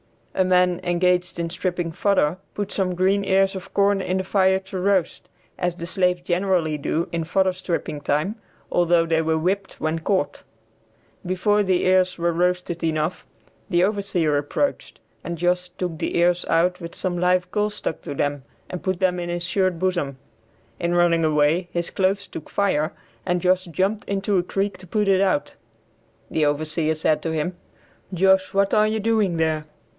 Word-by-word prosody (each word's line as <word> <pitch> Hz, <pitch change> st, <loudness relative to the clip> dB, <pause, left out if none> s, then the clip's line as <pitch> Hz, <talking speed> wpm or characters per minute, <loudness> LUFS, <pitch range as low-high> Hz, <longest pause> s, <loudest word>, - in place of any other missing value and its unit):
A 190 Hz, -, +2 dB
man 180 Hz, -1 st, +3 dB
engaged 180 Hz, 0 st, +1 dB
in 170 Hz, -1 st, -3 dB
stripping 175 Hz, -1 st, -2 dB
fodder 180 Hz, -2 st, +1 dB, 0.2 s
put 205 Hz, -1 st, -3 dB
some 185 Hz, -2 st, -1 dB
green 190 Hz, +3 st, +2 dB
ears 195 Hz, 0 st, +3 dB
of 190 Hz, -, -8 dB
corn 200 Hz, 0 st, +3 dB
in 185 Hz, 0 st, -1 dB
the 190 Hz, -, -1 dB
fire 190 Hz, 0 st, +3 dB
to 190 Hz, 0 st, -7 dB
roast 190 Hz, -2 st, 0 dB, 0.3 s
as 180 Hz, -1 st, 0 dB
the 170 Hz, -, -6 dB
slaves 180 Hz, 0 st, +2 dB
generally 175 Hz, -3 st, 0 dB
do 165 Hz, +4 st, -1 dB
in 170 Hz, -1 st, -1 dB
fodder 190 Hz, +2 st, +2 dB
stripping 170 Hz, -5 st, -3 dB
time, 150 Hz, +9 st, 0 dB, 0.4 s
although 175 Hz, -1 st, +3 dB
they 165 Hz, -1 st, +1 dB
were 160 Hz, 0 st, +1 dB
whipped 195 Hz, +5 st, -1 dB
when 155 Hz, +1 st, -1 dB
caught. 160 Hz, -3 st, -1 dB, 0.8 s
Before 195 Hz, +3 st, +1 dB
the 185 Hz, -3 st, +1 dB
ears 185 Hz, 0 st, +3 dB
were 170 Hz, 0 st, +1 dB
roasted 175 Hz, 0 st, -1 dB
enough, 155 Hz, +2 st, -1 dB, 0.4 s
the 175 Hz, -2 st, +3 dB
overseer 190 Hz, -7 st, +1 dB
approached, 145 Hz, -, -2 dB, 0.2 s
and 170 Hz, 0 st, -4 dB
Josh 180 Hz, +1 st, 0 dB
took 175 Hz, -4 st, -5 dB
the -, -, -1 dB
ears 175 Hz, +1 st, +2 dB
out 180 Hz, +2 st, +1 dB
with 170 Hz, 0 st, -8 dB
some 180 Hz, -2 st, -2 dB
live 180 Hz, 0 st, +2 dB
coals 210 Hz, 0 st, 0 dB
stuck 160 Hz, -, -4 dB
to -, -, -5 dB
them 145 Hz, -1 st, -1 dB, 0.3 s
and 180 Hz, -, -5 dB
put 185 Hz, -2 st, -2 dB
them 180 Hz, -1 st, +2 dB
in 175 Hz, 0 st, -4 dB
his 175 Hz, 0 st, -2 dB
shirt 185 Hz, 0 st, +1 dB
bosom. 175 Hz, -7 st, -1 dB, 0.6 s
In 170 Hz, 0 st, 0 dB
running 170 Hz, -1 st, +3 dB
away 155 Hz, +3 st, +2 dB
his 170 Hz, 0 st, -2 dB
clothes 195 Hz, +1 st, 0 dB
took 155 Hz, -, -9 dB
fire 160 Hz, -6 st, +1 dB, 0.3 s
and 180 Hz, -1 st, 0 dB
Josh 185 Hz, +1 st, +2 dB
jumped 190 Hz, +5 st, -1 dB
into 200 Hz, 0 st, 0 dB
a 175 Hz, -, +2 dB
creek 195 Hz, +1 st, -2 dB
to 185 Hz, -, -13 dB
put 210 Hz, +3 st, 0 dB
it 195 Hz, -1 st, +4 dB
out. 185 Hz, -7 st, +1 dB, 0.8 s
The 155 Hz, -, +2 dB
overseer 155 Hz, +2 st, 0 dB
said 155 Hz, 0 st, +1 dB
to 165 Hz, -, -1 dB
him, 160 Hz, +3 st, -2 dB, 0.6 s
"Josh, 190 Hz, +1 st, +3 dB
what 200 Hz, 0 st, +2 dB
are 215 Hz, 0 st, +4 dB
you 220 Hz, 0 st, -1 dB
doing 210 Hz, -5 st, +1 dB
there?" 160 Hz, -1 st, 0 dB
180 Hz, 180 wpm, -23 LUFS, 165-190 Hz, 0.8 s, it